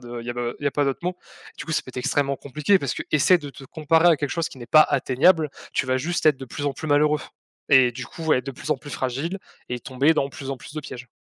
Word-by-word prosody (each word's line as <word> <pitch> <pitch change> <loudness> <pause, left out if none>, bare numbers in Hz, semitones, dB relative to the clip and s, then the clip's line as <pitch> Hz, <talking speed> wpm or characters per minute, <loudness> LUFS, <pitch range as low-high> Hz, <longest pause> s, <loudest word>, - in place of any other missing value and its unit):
de 120 0 -7
il - - -11
y - - -2
a - - -5
pas 120 -1 -2
il - - -6
y - - +2
a - - +3
pas 145 +2 0
d'autres 135 -1 -1
mots. 180 +1 -2 0.4
Du - - -5
coup, 165 - -3
ça - - +1
peut - - -17
être 125 - -17
extrêmement 140 +2 0
compliqué 150 +9 +1
parce - - -3
qu'essaie 155 +5 +3
de 145 -3 -8
te 135 - -13
comparer 160 +4 +2
à 165 - +5
quelque 145 -1 -3
chose 165 -1 -1
qui - - -13
n'est 120 - -9
pas 155 - +6
atteignable, 150 +4 +2 0.2
tu - - 0
vas 130 0 +1
juste 170 +6 -2
être 150 -3 +5
de 135 - -7
plus 145 +4 -5
en 140 - 0
plus 155 - -7
malheureux, 150 0 +3 0.5
et 130 -3 +6
du 130 +1 -7
coup, 165 - -9
ouais, 150 -5 +2
de 135 - -5
plus 135 +3 -8
en 150 - +3
plus 145 +2 -11
fragile 140 +10 -3 0.3
et 125 - -3
tomber 135 +5 +2
dans 140 -3 0
plus 135 0 -7
en 135 - -3
plus 130 - -12
de 155 - -3
pièges. 130 -4 -9
140 Hz, 300 wpm, -23 LUFS, 130-155 Hz, 0.5 s, pas